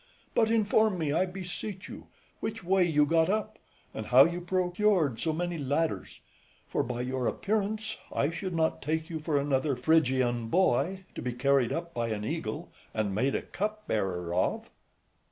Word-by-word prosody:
But 220 -1 +3
inform 215 -2 +3
me, 155 -4 -1
I 180 +4 +2
beseech 185 +1 -6
you, - - -10 0.3
which 220 -1 -4
way 190 +1 +3
you 150 -4 +3
got 165 +2 +3
up, 215 +1 -1 0.3
and 110 - -5
how 130 +2 +8
you 175 +1 -2
procured 180 - +1
so 160 - 0
many 175 +1 -2
ladders; 145 +4 -1 0.5
for, - - 0
by 120 - -3
your 130 0 -1
appearance, 215 +1 -1
I 145 - +1
should 175 +2 -4
not 160 -1 +1
take 160 +3 -2
you 160 - -3
for 155 -1 0
another 140 0 +1
Phrygian 125 -4 +2
boy, 190 +5 +2
to - - -6
be 125 - -2
carried 135 -1 +2
up 170 0 -3
by 120 -1 -1
an 105 -2 -3
eagle, - - -4 0.2
and 105 -3 0
made 130 +7 +1
a - - -1
cup 215 +1 -4
bearer 90 -5 -1
of. 90 - 0
160 Hz, 170 wpm, -29 LUFS, 130-190 Hz, 0.5 s, how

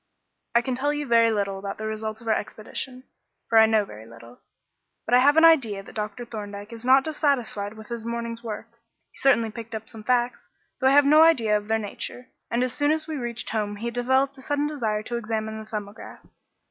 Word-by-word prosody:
"I 235 - +5
can 260 - -2
tell 275 +4 0
you 295 0 -3
very 230 -2 +4
little 200 -2 -1
about 195 0 -5
the 215 - -5
results 220 0 -4
of 230 - -12
our 220 - +4
expedition, 250 +5 -5 0.4
for 225 - +5
I 220 - +7
know 220 -2 +2
very 110 - -12
little; 115 +1 -14 0.7
but 235 - -2
I 250 - +8
have 285 +4 +5
an 325 - +8
idea 235 -12 +4
that - - -13
Dr. 215 +3 -4
Thorndyke 205 -1 -7
is 230 0 -7
not 265 +2 +5
dissatisfied 255 -9 -1
with 220 +1 -12
his 235 -2 -5
morning's 235 0 -4
work. 225 0 -6 0.4
He - - -16
certainly 230 -5 +3
picked 225 +1 -8
up 220 0 -7
some 220 -1 -10
facts, 245 +1 0 0.3
though 260 - +3
I - - +5
have 290 0 +6
no 305 +2 +6
idea 240 -10 +5
of 210 0 -2
their 220 0 +2
nature, 225 +4 -6 0.2
and 235 +1 +1
as 255 -1 0
soon 290 +2 +2
as 315 0 0
we 315 - -4
reached 240 -3 -4
home 210 -2 -2
he 235 +3 -4
developed 260 +3 +1
a - - -10
sudden 290 +2 -1
desire 225 -8 -2
to 235 +2 -3
examine 220 -1 -3
the 215 - -10
'Thumbograph.'" 210 -1 -8
230 Hz, 225 wpm, -25 LUFS, 215-260 Hz, 0.7 s, I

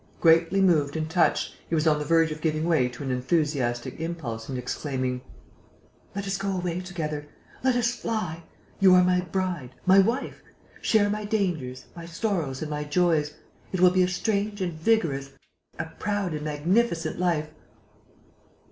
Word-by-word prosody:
Greatly 165 +3 +4
moved 155 -6 +3
and 155 0 -2
touched, 175 0 +2
he 165 - +1
was 155 0 +1
on 150 -2 +3
the 150 - -3
verge 165 0 +3
of 155 0 -6
giving 155 0 0
way 155 -7 +3
to 125 +3 -8
an 135 - -2
enthusiastic 130 -2 -1
impulse 150 -10 -5
and 130 - -3
exclaiming: 130 0 -3 0.9
"Let 200 0 -3
us 195 0 -1
go 195 0 -2
away 180 -1 -2
together!... 155 -5 -4 0.4
Let 260 -1 +3
us 240 -1 +2
fly!... 195 -10 -3 0.4
You 190 -2 +7
are 180 - +6
my 180 0 +3
bride... 180 -8 -3
my 190 +1 +7
wife.... 230 +8 0 0.4
Share 215 -2 +3
my 210 +1 -2
dangers, 175 -12 -2
my 170 -1 -8
sorrows 165 -6 -2
and 155 - -5
my 150 0 -2
joys.... 150 -1 +1 0.4
It 185 - -2
will 180 0 +7
be 185 0 +3
a 180 - +4
strange 205 +3 -1
and 180 -3 -2
vigorous, 155 -7 0 0.4
a 160 - -2
proud 205 -4 -1
and 150 -1 -4
magnificent 170 +6 0
life...." 160 -4 0
165 Hz, 165 wpm, -26 LUFS, 150-190 Hz, 0.9 s, You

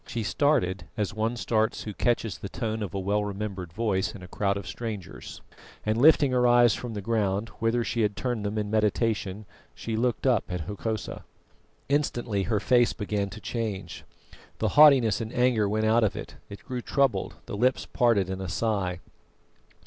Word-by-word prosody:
She 115 -1 -3
started 105 - +1
as 105 -2 -1
one 115 +2 -1
starts 110 -1 0
who 105 - -6
catches 115 -1 0
the 100 - -6
tone 110 +2 -3
of 100 -3 -4
a - - -1
well 100 +2 0
remembered 100 -3 -5
voice 100 -1 -1
in 95 - -10
a - - -9
crowd 100 +1 -1
of 100 - -6
strangers, 105 -2 -7 0.4
and 110 0 +1
lifting 145 +2 +5
her 125 -1 +3
eyes 120 -1 +6
from 120 -3 -5
the 105 - -3
ground, 105 -1 0
whither 115 +1 +1
she 115 - -1
had 105 -2 +1
turned 120 -4 -2
them 105 +1 -2
in 105 -1 -2
meditation, 105 -2 0 0.3
she 115 - -4
looked 120 +3 0
up 125 -6 +3
at 90 -1 -3
Hokosa. 105 +4 -4 0.6
Instantly 120 -7 0
her 110 -1 +1
face 120 +2 +3
began 105 -2 -2
to 110 - -9
change. 110 -3 -4 0.5
The - - 0
haughtiness 135 -8 +6
and 110 0 -5
anger 120 -5 +2
went 110 +1 0
out 110 +2 +4
of 105 - +1
it, - - -8
it 100 - -10
grew 125 -1 -4
troubled, 140 0 0
the - - -6
lips 125 +5 +1
parted 115 -6 +2
in 95 0 -4
a 95 - -4
sigh. 95 -3 -1
110 Hz, 185 wpm, -27 LUFS, 100-120 Hz, 0.6 s, eyes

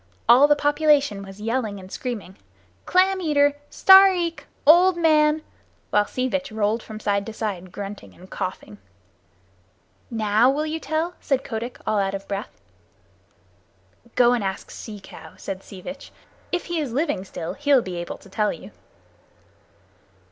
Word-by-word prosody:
All 255 +5 +7
the 295 - +5
population 290 -6 +2
was 195 0 -11
yelling 220 -2 -2
and 185 0 -12
screaming 220 -7 -5 0.5
"Clam 375 +1 +3
eater! 290 -3 +3 0.2
Stareek 380 -3 +5 0.2
[old 350 +4 +6
man]!" 310 -2 +3 0.5
while 205 0 +3
Sea 255 0 -2
Vitch 275 0 -3
rolled 215 +1 0
from 215 -1 -9
side 200 -2 0
to 225 - -6
side 190 -5 -4
grunting 200 +1 -8
and 185 - -15
coughing. 145 - -6 1.3
"Now 220 +1 +3
will 295 +3 0
you 315 +1 -3
tell?" 315 +3 -2
said 270 -2 -1
Kotick, 235 +1 -5
all 215 -1 +1
out 195 0 0
of 195 - -8
breath. 200 +3 -4 1.7
"Go 245 -1 +5
and 240 -4 0
ask 190 -1 -4
Sea 210 -2 -8
Cow," 195 - -13
said 195 -1 -6
Sea 190 -2 -12
Vitch. 275 +7 -9 0.4
"If 355 - -2
he 345 -1 -2
is 280 -7 -3
living 285 - -1
still, 170 -3 -6
he'll 280 -3 +3
be 180 -2 -6
able 175 0 -5
to - - -18
tell 210 +2 0
you." - - -10
240 Hz, 155 wpm, -23 LUFS, 200-300 Hz, 1.7 s, All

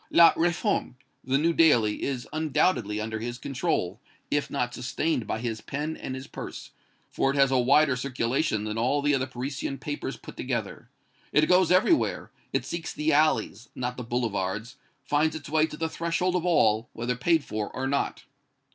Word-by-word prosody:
'La 170 -1 +7
Réforme,' 170 -6 0 0.3
the 130 +1 +1
new 165 +4 +2
daily, 120 -11 +4
is 130 -3 -3
undoubtedly 145 - +1
under 110 0 -3
his 120 +2 -4
control, 125 - -2 0.3
if 145 -1 0
not 125 -3 -2
sustained 125 +2 -1
by - - -1
his 115 -1 -4
pen 150 +3 -4
and 130 - -5
his 130 0 -7
purse, - - -8 0.4
for 135 - +1
it 135 - 0
has 135 -1 +4
a 130 - +3
wider 140 +2 +4
circulation 125 -2 -1
than 110 +1 -3
all 140 +5 +1
the 145 0 +3
other 130 -1 +1
Parisian 130 +2 -4
papers 135 -2 -5
put - - -11
together. 120 -5 -4 0.4
It 150 - +4
goes 180 -1 +4
everywhere 190 - +2 0.2
it - - -1
seeks 170 -1 -4
the 150 +1 0
alleys, 120 -7 +1
not 125 0 -3
the 125 - -6
boulevards, 115 0 -2 0.3
finds 150 +3 +1
its 150 -3 -7
way 155 +1 +3
to 150 - -9
the 165 - -1
threshold 170 +3 -1
of 180 0 0
all, 115 -9 +3
whether 120 +2 -2
paid 160 +5 +2
for 105 -4 -4
or 130 - -4
not." 140 +1 -1
135 Hz, 180 wpm, -27 LUFS, 120-155 Hz, 0.4 s, La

